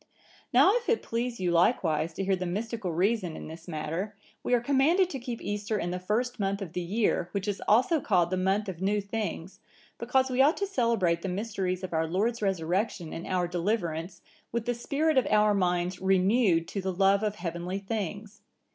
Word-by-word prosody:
"Now 395 - +6
if 475 - -5
it 460 - +2
please 235 +1 -3
you 180 -2 0
likewise 165 -3 +2
to 195 - -3
hear 195 0 +2
the 180 0 -4
mystical 210 +1 -3
reason 185 0 0
in - - -8
this 160 +2 -10
matter, 165 +6 -4 0.3
we 250 - +2
are - - +3
commanded 285 +9 +3
to 270 - -4
keep 240 -2 -6
Easter 205 +1 -2
in 175 -3 -2
the 180 - -3
first 225 +7 -1
month 195 0 0
of 185 -5 -7
the 180 - -2
year, 185 -1 0
which 200 0 -2
is 205 -1 -2
also 255 +9 +4
called 180 -8 +2
the - - +1
month 190 +3 +1
of 185 -2 -6
new 205 +2 +1
things, 200 -3 -4 0.4
because 265 -1 +1
we 255 +1 +3
ought 290 +5 +4
to 400 - 0
celebrate 230 - +1
the 195 - -3
mysteries 190 -2 -2
of 185 - -5
our 160 0 +1
Lord's 215 +8 0
Resurrection 185 -1 -1
and 165 - -6
our 180 -1 0
deliverance, 175 -2 -2 0.3
with 235 -1 -2
the 245 - 0
spirit 280 +5 +1
of 255 - -2
our 210 0 +4
minds 180 -1 0
renewed 190 -2 +3
to 195 - -3
the 190 0 -2
love 195 +2 +3
of 210 -1 -1
heavenly 175 +1 -4
things. 205 +1 -5
195 Hz, 200 wpm, -28 LUFS, 180-230 Hz, 0.4 s, Now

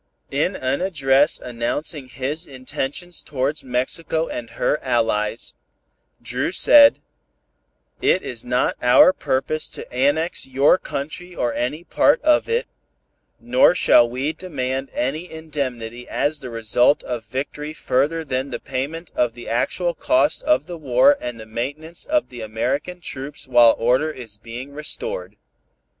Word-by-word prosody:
In 150 +7 0
an 130 +1 -1
address 145 -5 +3
announcing 130 +4 -3
his 145 +7 -4
intentions 135 +6 -4
towards 140 +2 -2
Mexico 145 +6 -1
and 115 -1 -6
her 125 +5 -1
allies, 115 -3 0 0.7
Dru - - -2
said 290 -1 +7 1.0
"It - - +2
is 120 -2 -5
not 125 +1 0
our 125 +9 +6
purpose 155 +2 -1
to - - -7
annex 145 +7 +1
your 135 +7 +4
country 175 +6 -6
or 120 -1 -1
any 150 +7 -2
part 285 - +3
of 310 +8 +3
it, 470 +1 +1 0.7
nor 255 -3 +4
shall 120 -8 +5
we 130 +6 -2
demand 135 -7 -4
any 155 +8 -3
indemnity 130 -7 -5
as 145 +2 0
the 130 - -7
result 115 +4 +2
of 120 -3 -4
victory 140 +6 -5
further 155 +6 0
than 130 -1 -2
the - - -5
payment 155 +6 -5
of 120 -2 +1
the 120 - -11
actual 170 +9 0
cost 145 -1 +2
of 130 +4 +2
the 175 0 -7
war 155 - +4
and 120 -2 -5
the 110 - -9
maintenance 145 +9 -5
of 305 0 0
the 120 -2 -9
American 130 +11 -3
troops 135 -4 -6
while 120 -2 +6
order 125 +7 +2
is 115 -8 -8
being 120 +5 -8
restored. 105 -9 -2
135 Hz, 140 wpm, -21 LUFS, 125-160 Hz, 1.0 s, said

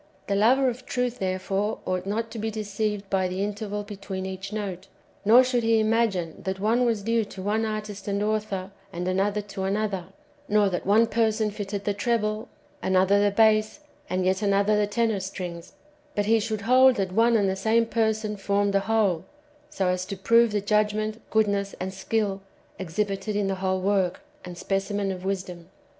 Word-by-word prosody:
The - - -1
lover 245 +7 +4
of 250 +1 -4
truth 250 -1 -1
therefore 195 +2 -1
ousdit 185 +1 -2
not 225 +3 -2
to 225 - -6
o - - -4
be 220 - -1
deceived 210 -1 -3
by 190 -1 +2
the 185 +2 -2
interval 205 0 -3
between 200 -2 -6
each 190 +1 -6
note, 195 -3 -5 0.4
nor 230 +5 +7
should 250 -1 +1
he 225 -1 +3
imagine 215 -7 0
that 190 0 -3
one 230 +5 +2
was 225 -4 0
due 230 +1 +1
to 195 - -9
one 215 +2 0
artist 210 -2 -5
and 200 0 0
author, 210 -3 -2 0.2
and 175 0 -4
another 200 +3 +1
to 200 -1 -7
another, 195 -2 -1 0.4
nor 210 -1 +4
that 180 0 -3
one 215 +3 +5
person 220 -2 +1
fitted 200 -1 -5
the 205 - +1
treble, 215 0 -1 0.3
another 190 +2 +3
the 205 - +4
bass, 215 +4 +3 0.3
and 185 0 0
yet 185 +2 +1
another 200 +1 +3
the 210 0 +2
tenor 220 -1 0
strings; 180 -2 -6 0.4
but 205 - +1
he 225 +2 +4
should 215 -1 -3
hold 255 +3 +5
that 195 -4 -1
one 230 +3 +4
and 200 -2 +2
the 190 - 0
same 225 +4 +2
person 220 -2 0
[formed 200 0 0
the 200 - +4
whole], 200 -5 +1 0.4
so 250 -11 -2
as 180 0 0
to 200 -1 -5
prove 230 +3 +4
the 205 -1 0
judgment, 215 +2 0
goodness, 200 -2 +1
and 190 +1 -4
skill 200 0 -1 0.4
exhibited 195 +3 -2
in 205 -1 +1
the 195 - 0
whole 190 0 0
work 190 -2 +1 0.2
and 180 -1 -8
[specimen 195 +1 -1
of] 185 -1 -6
wisdom. 185 -3 -4
205 Hz, 185 wpm, -26 LUFS, 195-220 Hz, 0.4 s, nor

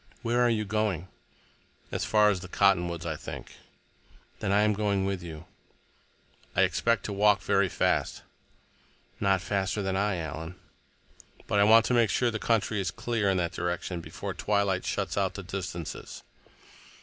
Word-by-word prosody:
"Where 120 +1 +1
are 120 - +4
you 110 -2 0
going?" 100 -4 -1 0.8
"As - - -2
far 105 -1 +4
as 95 - -2
the 90 - -9
cottonwoods, 90 -3 +2
I 80 -2 -2
think." - - -8 0.9
"Then 100 - -1
I 100 +1 +4
am 105 0 +3
going 100 -2 0
with 95 -2 -2
you." 80 -2 -8 1.1
"I - - +5
expect 115 -3 +1
to 105 - -3
walk 100 0 +4
very 100 -1 +2
fast." - - 0 1.0
"Not 95 -2 +2
faster 100 +1 -1
than 95 0 -1
I, 100 0 +1
Alan." 80 +2 -5 0.9
"But 105 - +1
I 100 - +6
want 115 +1 +7
to - - 0
make 120 -3 +4
sure 120 +5 +1
the 110 - -3
country 110 -2 +1
is 95 - -1
clear 115 -3 -1
in 95 - +2
that 85 -1 0
direction 90 0 -3
before - - -6
twilight 100 -3 0
shuts - - -1
out - - 0
the - - -6
distances." 90 -4 -6
100 Hz, 165 wpm, -28 LUFS, 90-105 Hz, 1.1 s, want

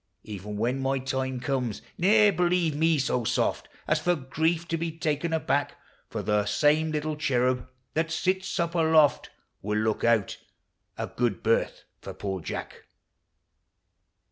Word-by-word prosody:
Even 105 0 -7
when 120 +5 0
my 135 0 0
time 130 -1 -2
comes, 125 -4 -2
ne'er 210 +3 +5
believe 175 -3 +1
me 160 +1 +3
so 125 -3 0
soft - - 0 0.2
As 155 - +2
for 175 +3 +1
grief 160 +4 -1
to 165 - 0
be 165 0 -2
taken 160 0 -2
aback; 145 -3 0 0.3
For - - -4
the 105 -1 +1
same 150 +8 +3
little 155 0 -2
cherub 130 -3 0 0.2
that 165 +1 0
sits 185 +4 -1
up 170 0 0
aloft 160 -3 +3 0.3
Will 105 +1 -1
look 110 0 0
out 115 -4 +2 0.6
a - - -2
good 115 -7 -2
berth 115 +1 +1 0.2
for - - -8
poor 95 -3 -4
Jack! - - -6
145 Hz, 145 wpm, -27 LUFS, 120-165 Hz, 0.6 s, ne'er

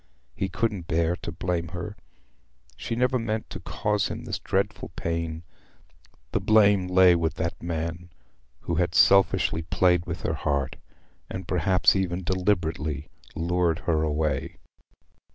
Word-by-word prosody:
He 95 - -2
couldn't 95 -2 -2
bear 85 +1 +1
to - - -6
blame 85 -1 -2
her: 100 +4 -5 0.8
she 115 - -4
never 125 +1 +2
meant 110 -1 -3
to - - -6
cause 105 -1 -1
him - - -6
this - - -4
dreadful - - -1
pain. 85 0 -3 0.9
The - - +1
blame 100 -3 +4
lay 90 -1 +6
with 80 -2 0
that 85 0 -3
man 85 +1 -4 0.5
who 85 - -2
had 85 -1 -1
selfishly 95 -4 +4
played 90 +1 +2
with 85 0 -5
her 80 - 0
heart—had 70 -3 -5
perhaps 95 0 +3
even 95 -1 -1
deliberately 85 -5 -1 0.3
lured 85 0 +1
her 80 -2 +2
away. 75 -2 -1
85 Hz, 135 wpm, -26 LUFS, 80-95 Hz, 0.9 s, lay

